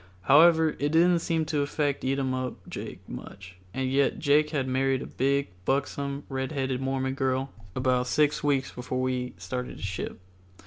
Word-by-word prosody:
However, 160 - +6
it 145 +2 0
didn't 170 +1 +5
seem 165 -1 0
to 150 -1 0
affect 145 0 -1
Eatumup 130 -1 -1
Jake - - -7
much, 90 -2 -9
and 130 +6 -2
yet 140 0 +2
Jake 150 0 +3
had 140 -4 -1
married 130 0 +1
a - - -6
big, 140 +2 0
buxom, 140 +3 -1
red 130 +1 -3
headed 135 -3 -1
Mormon 130 0 -1
girl 135 0 -1 0.2
about 125 -1 +1
six 150 +3 +2
weeks 140 -3 +1
before 125 +1 -4
we 125 -1 -1
started 125 -1 -5
to - - -10
ship. 95 -2 -4
135 Hz, 165 wpm, -27 LUFS, 130-145 Hz, 0.2 s, However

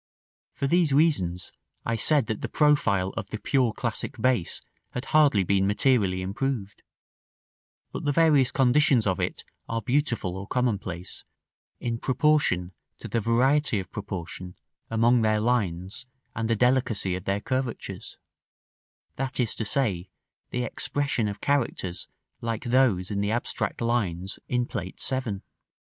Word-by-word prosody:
§ - - - 0.5
IX. - - -30
For 140 - +1
these 165 0 +3
reasons, 110 - +2 0.3
I 115 - 0
said 145 +5 +3
that 110 - -3
the - - -3
profile 115 -11 +3
of 110 -2 -4
the - - -4
pure 125 +2 +1
classic 120 +3 -3
base 120 -6 +1 0.3
had 125 - -4
hardly 145 -10 +5
been 95 +1 +2
materially 100 -4 +2
improved; 105 +1 -3 1.1
but - - -5
the 145 - +3
various 145 -4 +4
conditions 135 -2 +4
of 95 -3 +1
it - - -2 0.3
are 115 - 0
beautiful 125 -8 0
or 95 +1 -6
commonplace, 100 -8 -2 0.6
in 115 -1 -2
proportion 125 - +2 0.2
to - - -8
the 115 - -1
variety 125 +2 +3
of 95 - -7
proportion 90 -2 -6 0.3
among 115 +2 +3
their 110 -1 +2
lines 105 0 -1 0.3
and 115 0 -2
the 115 - +3
delicacy 125 -5 +2
of 95 - -6
their 100 +1 0
curvatures; 130 +2 -4 1.0
that 135 0 -2
is 120 -3 +2
to 110 - -3
say, 100 -7 0 0.4
the 125 - -2
expression 130 -1 -1
of 100 0 -5
characters 120 -10 -1 0.3
like 115 0 -3
those 120 -8 +2
of 100 -1 -1
the 100 - 0
abstract 120 +2 -2
lines 100 -6 -1
in 125 -1 +1
Plate 90 -5 -6
VII. 120 -7 -1
115 Hz, 145 wpm, -26 LUFS, 100-130 Hz, 1.1 s, hardly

